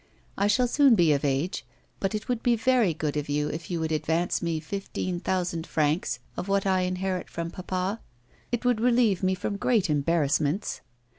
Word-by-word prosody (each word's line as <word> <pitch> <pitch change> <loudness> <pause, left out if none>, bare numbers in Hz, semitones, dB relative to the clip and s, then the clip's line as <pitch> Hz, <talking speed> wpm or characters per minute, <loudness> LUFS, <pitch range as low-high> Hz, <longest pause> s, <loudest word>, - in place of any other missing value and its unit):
I 200 - +1
shall 245 +4 +3
soon 275 -1 +5
be 170 -6 +4
of 140 - -1
age, 140 +5 -1 0.4
but 195 +2 -1
it 210 - -4
would 245 -2 -1
be 240 -1 +3
very 235 -4 +3
good 150 -2 -3
of 145 -1 -3
you 150 +1 0
if 160 +1 -6
you 175 -2 -2
would 160 0 -2
advance 160 +2 0
me 165 -2 -1
fifteen 185 +1 -4
thousand 175 -3 -2
francs 150 -4 0 0.2
of 180 - -4
what 200 0 +1
I 190 -1 +3
inherit 185 0 -2
from 170 0 -4
papa; 185 +3 -3 0.5
it 240 0 -2
would 245 -3 +2
relieve 235 -6 +3
me 185 0 +2
from 200 +2 -3
great 205 -6 +2
embarrassments. 150 +3 0
180 Hz, 190 wpm, -27 LUFS, 160-205 Hz, 0.5 s, soon